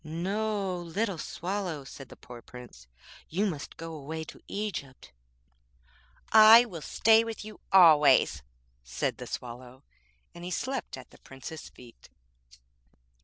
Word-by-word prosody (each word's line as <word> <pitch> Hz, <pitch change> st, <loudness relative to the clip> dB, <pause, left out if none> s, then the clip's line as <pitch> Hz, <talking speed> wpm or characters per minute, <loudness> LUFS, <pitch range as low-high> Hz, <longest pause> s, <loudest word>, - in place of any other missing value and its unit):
'No, 195 Hz, +4 st, -2 dB
little 175 Hz, +2 st, -3 dB
Swallow,' 180 Hz, -3 st, -4 dB
said 135 Hz, 0 st, -11 dB
the -, -, -12 dB
poor 120 Hz, -1 st, -12 dB
Prince, 120 Hz, -, -13 dB, 0.4 s
'you 190 Hz, +6 st, 0 dB
must 155 Hz, -8 st, -5 dB
go 165 Hz, 0 st, -7 dB
away 160 Hz, +2 st, -6 dB
to -, -, -13 dB
Egypt.' 175 Hz, -, -6 dB, 1.2 s
'I 220 Hz, +2 st, +9 dB
will 175 Hz, -9 st, -9 dB
stay 225 Hz, +7 st, +4 dB
with 225 Hz, -2 st, -7 dB
you 215 Hz, -1 st, -11 dB
always,' 160 Hz, -6 st, +6 dB, 0.4 s
said -, -, -3 dB
the -, -, -7 dB
Swallow, 125 Hz, +2 st, -8 dB, 0.5 s
and 175 Hz, -, -11 dB
he 180 Hz, -, -5 dB
slept 260 Hz, -, -4 dB
at 130 Hz, -, -13 dB
the -, -, -18 dB
Prince's 135 Hz, +4 st, -10 dB
feet. 120 Hz, -2 st, -17 dB
165 Hz, 130 wpm, -28 LUFS, 135-205 Hz, 1.2 s, I